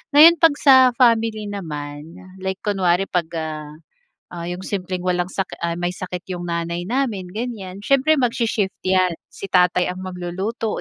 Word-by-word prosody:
Ngayon 330 +2 +9
'pag 325 -3 +5
sa 275 -2 +8 0.2
family 225 -4 +2
naman 150 -3 -7 0.2
like 190 0 -4
kunwari 190 -3 +2
'pag, 170 -2 0
ah, 155 -2 -4 0.7
ah, 170 -1 -6
yung 180 +1 -4
simpleng 185 -2 -4
walang 180 +1 0
sakit 190 -1 -3
ay, 170 0 -1
may 175 +1 -1
sakit 180 -2 -6
yung 175 - -6
nanay 170 +1 -2
namin, 215 -5 -2
ganiyan, 205 -4 -5
siyempre 275 +6 +3
magshi-shift 230 -5 0
yan, 185 -2 +2 0.2
si 195 - -8
tatay 180 -1 +3
ang 185 +1 -5
magluluto 185 +5 -3
185 Hz, 155 wpm, -21 LUFS, 175-220 Hz, 0.7 s, Ngayon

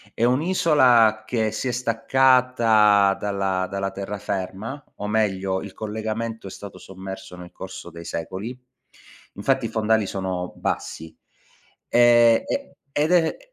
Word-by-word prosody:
è 115 - -1
un'isola 130 -7 +4
che 110 -3 0
si 110 +4 -3
è - - 0
staccata 115 -4 +3
dalla 95 -2 -1
dalla 95 0 -3
terraferma, 100 +5 -5
o 105 - -4
meglio 95 -3 0
il 100 -2 -9
collegamento 110 0 -4
è - - -8
stato 100 0 -10
sommerso 95 -1 -9
nel 90 0 -11
corso 95 -1 -9
dei 85 0 -10
secoli. 95 +10 -5 0.8
Infatti 130 +4 +1
i - - -2
fondali 110 -1 +1
sono 95 -2 -4
bassi. 80 0 -4 0.8
Ehm, 120 -1 +5
e 280 0 -4 0.2
ed 150 +3 +1
è 170 -3 +3
110 Hz, 130 wpm, -23 LUFS, 95-120 Hz, 0.8 s, Ehm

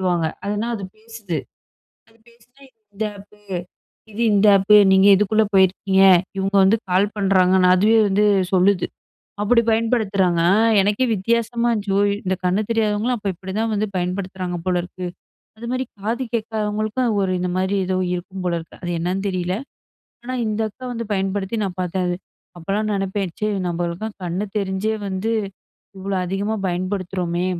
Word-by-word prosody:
வாங்க. 170 -2 +1 0.2
அதுனா, 210 +3 -2
அது 200 - -6
பேசுது, 220 -6 -6 0.7
அது 225 - -25
பேசினா 240 +4 -25 0.3
இந்த 215 +2 -3
ஆப்பு, 205 +1 -16 0.7
இது 220 +3 -5
இந்த 205 +1 +4
ஆப்பு 195 +2 +5 0.2
நீங்க 190 +1 +6
இதுக்குள்ளே 215 +2 +2
போயிருக்கீங்க. 190 0 +3 0.4
இவங்க 195 +1 -1
வந்து 200 +4 +4
கால் 185 +3 +3
பண்ணுறாங்கன்னு 190 -2 +3
அதுவே 215 +4 +4
வந்து 200 +2 +2 0.3
சொல்லுது. 185 0 +3 0.6
அப்டி 230 +2 +4
பயன்படுத்துறாங்க, 205 -6 +1 0.4
எனக்கே 205 +6 +1
வித்தியாசமா 235 +3 0
இருந்துச்சு. 205 -3 -2
ஓ! - - +4 0.2
இந்த 190 0 0
கண்ணு 185 +3 +2
தெரியாதவங்களும் 220 +1 +1
அப்போ 200 - -4
இப்டி 190 +2 -8
தான் 225 -1 0
வந்து 210 +1 0
பயன்படுத்துறாங்க 180 0 -3
போல 180 - +1
இருக்கு. 180 0 -7 0.5
அது 235 - -7
மாதிரி 255 +1 -1
காது 230 +6 -2
கேட்காதவங்களுக்கும் 215 +1 -1
ஒரு 190 - 0
இந்த 180 - -1
மாதிரி 190 +2 0
ஏதோ 185 0 0 0.2
இருக்கும் 185 +1 -6
போல 175 -1 0
இருக்கு, 165 - -14
அது 175 - -3
என்னன்னு 185 +3 -1
தெரியல. 180 -1 -2 0.7
ஆனா, 255 +1 -4
இந்த 215 +1 -2
அக்கா 255 - -13
வந்து 230 -2 -4
பயன்படுத்தி 195 +2 -2
நான் 185 -1 -5
பாத்தேன். 180 +1 -2
அது. 175 - -1 0.4
அப்போலாம் 205 +5 -2
நினைப்பேன், 195 -2 -2
ச்ச 215 - 0 0.2
நம்பளுக்கும் 175 +5 -3
கண்ணு 180 +4 -2
தெரிஞ்சே 200 +2 -1
வந்து 195 +4 -2 0.7
இவ்ளோ 195 +1 -3
அதிகமா 200 +4 -2
பயன்படுத்துறோமே, 180 -1 -2
195 Hz, 150 wpm, -21 LUFS, 185-215 Hz, 0.7 s, நீங்க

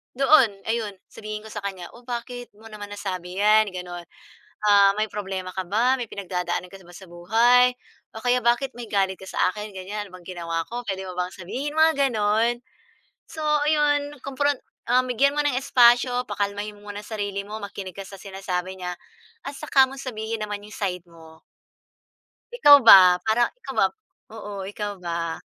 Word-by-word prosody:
doon 270 -2 +5 0.2
ayun, 225 -3 -1 0.2
sabihin 215 0 -7
ko 220 - -11
sa 210 - -4
kanya, 190 -3 -6
o 240 0 -17
bakit 245 0 -6
mo 225 +1 -14
naman 205 -1 -8
nasabi 185 -3 -5
yan 215 +1 +5
gano'n. 175 -1 -7 0.6
Ah, 200 -1 +6
may 215 - +1
problema 190 -3 -5
ka 190 - -2
ba, 235 +6 +2
may 235 - -4
pinagdadaanan 180 -2 -4
ka 195 -1 -12
ba 175 +1 -16
sa 190 - -11
buhay 235 +8 +4 0.4
o 220 - -6
kaya 245 0 +3
bakit 240 +3 +2
may 240 -2 -8
galit 195 -2 +1
ka - - -12
sa - - -6
akin 210 0 -7
ganyan, 200 +3 -5
ano - - -19
bang 175 - -18
ginawa 165 -1 -3
ko, 245 +1 -5
puwede 190 -1 -3
mo 180 - -7
bang 180 0 -2
sabihin, 265 +12 -5
mga 320 0 +5 0.2
gano'n. 220 +3 +1 0.7
So 325 -1 -9 0.3
ayon 295 -1 +1
kompron 285 +1 0 0.3
um 255 +1 +3
bigyan 280 +4 +2
mo - - +2
ng 275 -4 +1
espasyo, 245 0 +4
pakalmahin 205 0 -3
mo 205 0 -15
muna 205 +1 -8
sarili 205 -2 -4
mo, 215 +2 -7
makinig 200 -2 -8
ka 195 - -6
sa 195 - -10
sinasabi 190 -1 -4
niya 180 -1 -4 0.5
at 280 - -5
saka 270 -1 +4
mo 270 - -10
sabihin 220 -3 -5
naman 205 -1 -5
'yong 210 - -13
side 180 -4 -3
mo. 160 -1 -16 1.1
Ikaw 290 -12 +9
ba, 180 -3 +9
parang 230 +2 +2
ikaw - - -8
ba - - +5 0.5
oo, 210 -2 -8 0.2
ikaw 205 0 -4
ba? 170 -1 -3
210 Hz, 180 wpm, -24 LUFS, 190-245 Hz, 1.1 s, Ikaw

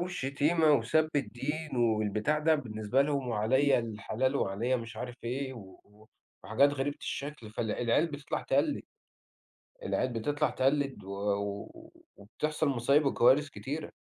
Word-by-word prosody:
والشتيمة 155 -1 +2
وسب 145 +5 +3
الدين 150 +3 -3
والبتاع 110 +4 +1
ده 160 +1 +3
بالنسبة 120 -2 0
لهم 140 -3 -1
وعليَّ 125 +6 +3
الحلال 115 +3 -1
وعليَّ 115 +4 0
مش 115 -1 -8
عارف 125 -1 -6
إيه، 130 +3 -3
و 105 0 -15 0.3
وحاجات 110 +10 +3
غريبة 145 +1 -2
الشكل، 140 -6 -5
فالع 110 0 -3
العيال 120 +7 +2
بتطلع 145 -2 -4
تقلد. - - +1 1.0
العيال 130 -1 -1
بتطلع 145 +7 0
تقلد 135 -4 0
و 95 - -11 0.7
و - - -14 0.2
وبتحصل 150 +10 -2
مصايب 140 +4 +3
وكوارث 135 +2 +4
كتيرة. 145 +3 -5
130 Hz, 130 wpm, -30 LUFS, 115-145 Hz, 1.0 s, وكوارث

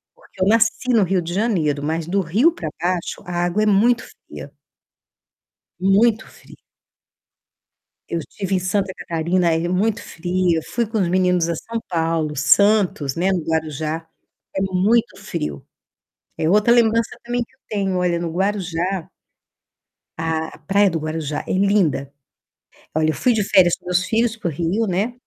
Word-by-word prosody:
Porque 185 - -10
eu - - +3
nasci 230 +3 +2
no 225 -3 +4
Rio 185 0 0
de 170 +1 -5
Janeiro. 170 -9 0
Mas 160 +2 -2
do 195 +4 +1
Rio 210 - +3
pra 170 - -5
baixo, 175 0 -2
a 175 0 -1
água 175 +5 0
é - - +2
muito 225 +4 +3 0.2
fria. - - -9 1.3
Muito 215 +4 +3
fria. - - -17 1.5
Eu 170 - -2
estive 195 +4 -4
em - - +3
Santa 190 +2 -1
Catarina, 170 +1 0
aí 165 +1 0
é - - -2
muito 200 +4 0
fria. 175 0 -1
Fui 235 -1 -2
com 220 +1 -3
os 185 -4 +1
meninos 180 -1 +2
a - - 0
São 230 +8 -5
Paulo, 165 -3 -1
Santos, 175 -2 +3
né, 180 +3 +1
no 180 -4 -1
Guarujá. 160 0 -2 0.5
É 190 - +1
muito 195 +2 +1
frio. 165 - -4 0.7
É 160 - 0
outra 210 +4 +4
lembrança 230 -1 +2
também 240 0 -1
que - - -33
eu - - -36
tenho 195 -3 -1
olha, 175 -1 +1
no 170 -1 -3
Guarujá 185 -1 -1 1.1
a 160 0 -1
a - - -13
praia 195 +6 +2
do 165 - -2
Guarujá 155 -1 -4
é - - -2
linda. 185 -8 +1 0.8
Olha, 155 0 +2
eu - - +1
fui 250 - +2
de 215 -2 +1
férias 180 -3 +4
com - - -28
meus 180 0 +1
filhos 225 +1 +1
para 215 - -4
o - - -4
Rio, 175 +9 -1
né. 200 +6 -1
185 Hz, 170 wpm, -21 LUFS, 165-210 Hz, 1.5 s, no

